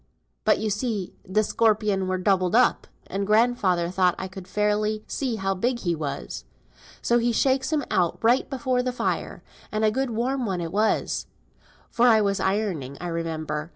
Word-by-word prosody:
But - - +4
you 215 0 -2
see 210 -3 -2 0.2
th' 215 +2 +3
scorpion 210 -4 +1
were 185 0 0
doubled 185 0 +1
up, 250 +1 +3 0.2
and 195 +1 -3
grandfather 210 -6 +2
thought 180 -1 +2
I 190 - -4
couldn't 185 -1 -10
fairly 210 +1 0
see 260 -5 -2
how 195 -2 -1
big 235 +6 -1
he 175 -2 0
was. 140 - -5 0.6
So 240 0 +3
he 235 +1 +1
shakes 265 +5 +1
him 300 -2 +1
out 175 -3 +1
right 240 +3 +3
before 255 -2 0
the 250 0 -1
fire; - - -3 0.3
and 215 0 +1
a 215 - +3
good 265 +3 -1
warm 245 +2 -1
one 185 -3 -2
it 165 -1 -4
was, 215 +3 0 0.6
for 240 +1 +3
I 225 -2 +6
was 200 -2 +1
ironing, 190 -10 -1
I 175 - -4
remember. 160 -2 -3
210 Hz, 180 wpm, -25 LUFS, 185-235 Hz, 0.6 s, I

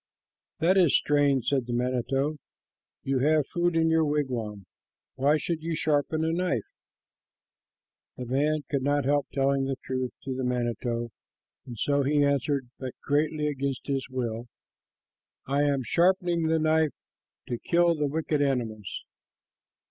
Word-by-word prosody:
"That 180 +4 +3
is 175 -6 +5
strange," 145 -4 +2
said 135 -4 0
the 120 - -3
manito, 130 +4 0 0.7
"You 135 -1 0
have 150 +2 +3
food 175 -1 0
in 165 0 +3
your 160 0 +4
wigwam. 125 -9 -2 0.5
Why 140 +3 +3
should 160 +1 -3
you 165 0 -2
sharpen 155 +1 +1
a 160 - +1
knife?" 170 - 0 1.5
The 125 - -5
man 145 +4 +1
could 140 -2 -1
not 145 0 +1
help 145 +1 +2
telling 135 0 +1
the 135 0 -1
truth 130 -1 -2
to 130 -1 -3
the 130 - -3
manito, 120 -1 -2 0.6
and 120 -2 -8
so 140 +5 +1
he 145 +1 +2
answered, 140 -2 0
but 130 -2 -5
greatly 150 +1 +1
against 140 -3 -2
his 135 -2 -2
will, 120 -2 -3 1.0
"I 140 +2 +1
am 140 -2 +1
sharpening 175 - +2
the 160 0 +2
knife 155 -1 +2 0.5
to 120 - -2
kill 170 0 +3
the 150 -2 -1
wicked 150 0 -1
animals." 115 -7 -2
140 Hz, 145 wpm, -27 LUFS, 130-155 Hz, 1.5 s, is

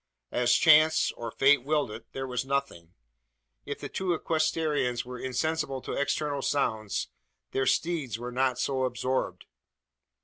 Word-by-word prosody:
As 120 0 +3
chance, 155 0 +5
or 115 -1 -6
fate, 135 +3 +4
willed 145 -4 0
it, 110 +2 -10
there 135 0 -4
was 125 -1 -2
nothing. 135 -12 -3 0.7
If - - -4
the - - -5
two 185 -2 -1
equestrians 155 -7 0
were 125 0 -7
insensible 135 +2 -1
to - - -4
external 145 0 -1
sounds, 110 -8 -1 0.4
their 135 0 0
steeds 155 -10 0
were 120 +1 -6
not 130 0 +1
so 130 +1 0
absorbed. 130 +1 -2
135 Hz, 140 wpm, -28 LUFS, 125-150 Hz, 0.7 s, chance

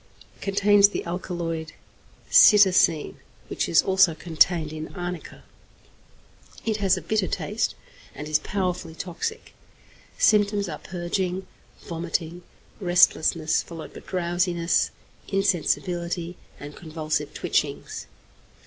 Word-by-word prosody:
Contains 200 0 +4
the - - -4
alkaloid 170 -2 -4 0.6
cytisine, 190 -6 +5 0.3
which - - -2
is 85 - +5
also 190 -3 +4
contained 160 -1 +1
in 155 0 -6
arnica. 175 -2 -6 1.2
It 220 -2 0
has 195 -2 +2
a - - -6
bitter 215 -4 0
taste, - - -2 0.4
and 150 +2 -7
is 155 0 +2
powerfully 180 -2 -3
toxic. 190 - -5 0.6
Symptoms 205 -1 +3
are 150 -3 -6
purging, 180 +1 -3 0.4
vomiting, 170 0 -4 0.4
restlessness, 175 -3 +3
followed 165 -2 -10
by - - -9
drowsiness, 175 -1 0 0.4
insensibility, 175 -2 -1 0.2
and 145 +1 -9
convulsive 155 -2 -4
twitchings. - - -2
175 Hz, 100 wpm, -25 LUFS, 165-190 Hz, 1.2 s, cytisine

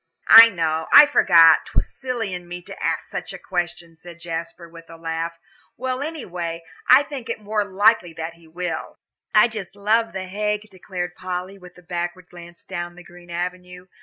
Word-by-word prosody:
"I 230 0 +12
know 160 -5 -2
I 295 - +10
forgot 170 - +5
'twas - - -3
silly 240 -7 -4
in 180 -1 -7
me 175 0 -8
to - - -10
ask - - -1
such - - -6
a - - -7
question," 175 -2 -4
said 170 0 -13
Jasper, 170 0 -6
with 165 0 -15
a 165 - -11
laugh. 165 0 -4 0.4
"Well, 255 +1 -3
anyway, 175 - -5 0.2
I 260 +3 +7
think 275 -5 -8
it 230 - -3
more 210 0 -1
than 200 -2 -13
likely 205 -4 +3
that 160 +1 -6
he 170 -1 -20
will." 170 0 -5 0.4
"I 210 +3 +7
just 210 -5 -7
love 215 0 +1
The 190 -1 -5
Hague," 210 +2 -3
declared 180 -1 -6
Polly, 185 +2 -6
with 180 -1 -15
a 180 - -16
backward 175 0 -5
glance 175 -1 -13
down 175 0 -6
the 180 - -13
green 175 0 -16
avenue. 180 +1 -6
180 Hz, 190 wpm, -22 LUFS, 170-210 Hz, 0.4 s, I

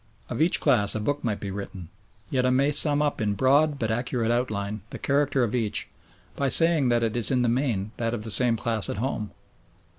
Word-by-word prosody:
Of - - -3
each 165 +3 +2
class 115 -9 +2
a - - -2
book 145 +7 -3
might 110 -4 -2
be 100 - -6
written, 95 -3 -8 0.4
yet 130 -2 0
I 125 - +2
may 135 +3 +2
sum 150 0 +2
up 145 -5 -2
in 105 -1 -1
broad 140 +6 +2
but 110 -4 -2
accurate 120 0 -2
outline 105 -4 -3
the - - -8
character 140 -2 0
of 115 - -2
each 115 -4 -2 0.5
by 140 - -1
saying 160 -2 +3
that 120 -1 +1
it 115 -1 -2
is 120 -3 +5
in 125 -2 +1
the - - +1
main 115 -5 -1
that 115 0 -2
of 105 - -7
the 110 - -2
same 120 -1 +5
class 110 -2 +1
at - - -4
home. 110 -3 -3
120 Hz, 220 wpm, -25 LUFS, 110-140 Hz, 0.5 s, is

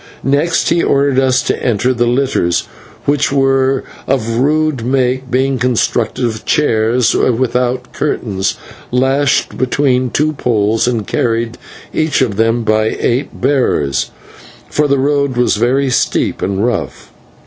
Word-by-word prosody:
Next 145 +5 +1
he 170 0 +2
ordered 140 -1 +2
us 130 -1 +2
to - - -2
enter 125 +1 +1
the 120 -1 0
litters, 120 -9 +1 0.4
which 145 0 +1
were 135 -1 +2 0.2
of 115 -3 0
rude 150 -2 +1
make, 130 +1 0
being 130 +1 0
constructed 125 0 0
of 110 -1 -3
chairs 115 -3 +2
without 125 0 0
curtains, 100 -9 -2 0.3
lashed 135 +2 +1
between 130 -1 +1
two 155 +5 0
poles, 115 -4 0
and 115 -4 -1
carried, 115 +1 -1 0.3
each 155 -1 0
of 105 -6 -2
them, 115 +1 +1
by 110 0 +2
eight 125 +4 -1
bearers, 100 - +1 0.6
for 150 0 +1
the 140 0 +2
road 140 -1 0
was 125 - +2
very 130 +2 +1
steep - - 0
and 100 +3 -1
rough. 120 -4 -3
125 Hz, 135 wpm, -15 LUFS, 115-135 Hz, 0.6 s, he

